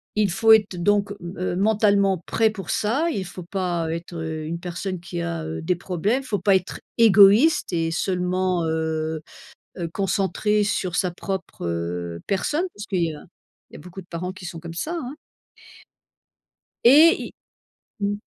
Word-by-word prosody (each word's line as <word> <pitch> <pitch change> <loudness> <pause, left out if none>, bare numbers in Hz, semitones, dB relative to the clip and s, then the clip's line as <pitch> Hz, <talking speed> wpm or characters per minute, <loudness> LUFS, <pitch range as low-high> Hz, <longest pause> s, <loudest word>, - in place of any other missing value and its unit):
il 210 -2 +2
faut 220 +4 +4
être 210 -3 +5
donc 205 +3 +1 0.3
heu, 180 -1 -2
mentalement 200 -1 +3
prêt 225 -1 +2
pour 195 -6 -8
ça, 275 +11 +1
il 195 - -3
faut 180 +1 -9
pas 175 -2 -2
être, 170 +1 -6
heu, 160 -1 -4
une 170 +2 -4
personne 180 +1 -4
qui 170 - -5
a, 85 -1 -3
heu, 80 +1 -5
des 180 +2 +1
problèmes, 190 +8 -1
faut 215 -5 -2
pas 195 +2 +3
être 185 -1 -2 0.2
égoïste 220 +8 +6
et 165 -1 0
seulement, 180 0 0
heu 160 0 -2 0.6
heu, 170 - -3
concentré 200 +2 +1
sur 185 -3 -1
sa 185 -2 +1
propre, 190 - -5
heu, 85 0 -3
personne 295 - 0
parce 205 0 -8
qu'il 185 -4 0
y 160 - -2
a 150 - -11 0.5
il - - -16
y - - -7
a - - -11
beaucoup 180 +4 -10
de 180 - -17
parents 180 +2 -5
qui 185 0 -12
sont 170 - -7
comme 165 0 -8
ça, 305 - -3
hein? 260 -1 -6 1.7
Et 305 +7 +6 0.7
il 200 - 0
mmh. 205 - -1
185 Hz, 175 wpm, -23 LUFS, 165-205 Hz, 1.7 s, égoïste